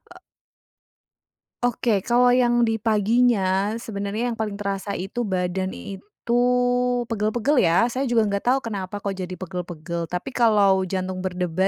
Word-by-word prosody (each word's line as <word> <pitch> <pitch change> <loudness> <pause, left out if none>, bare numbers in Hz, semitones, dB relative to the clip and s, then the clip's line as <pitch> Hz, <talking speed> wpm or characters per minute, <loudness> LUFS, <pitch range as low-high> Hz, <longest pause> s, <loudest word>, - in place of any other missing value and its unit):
E - - -14 1.4
Oke, 235 -3 +1
kalau 245 +1 +4
yang 240 -1 +3
di 225 -1 0
paginya, 215 -2 +2
sebenarnya 220 +1 -3
yang 225 - -7
paling 210 -2 -2
terasa 200 0 -3
itu, 205 +5 -3
badan 185 0 -1
itu 210 +5 -4 0.7
pegel-pegel, 230 +6 +1
ya. 175 +5 +4
Saya 265 +1 -1
juga 235 -2 +3
nggak 200 - -2
tahu, 265 +2 +4
kenapa 200 -3 -5
kok 200 - -1
jadi 185 -1 -5
pegel-pegel? 170 -2 -5
Tapi 180 +9 -4
kalau 200 -6 +3
jantung 185 0 -3
berdebar, 180 0 -1
200 Hz, 140 wpm, -23 LUFS, 185-235 Hz, 1.4 s, kalau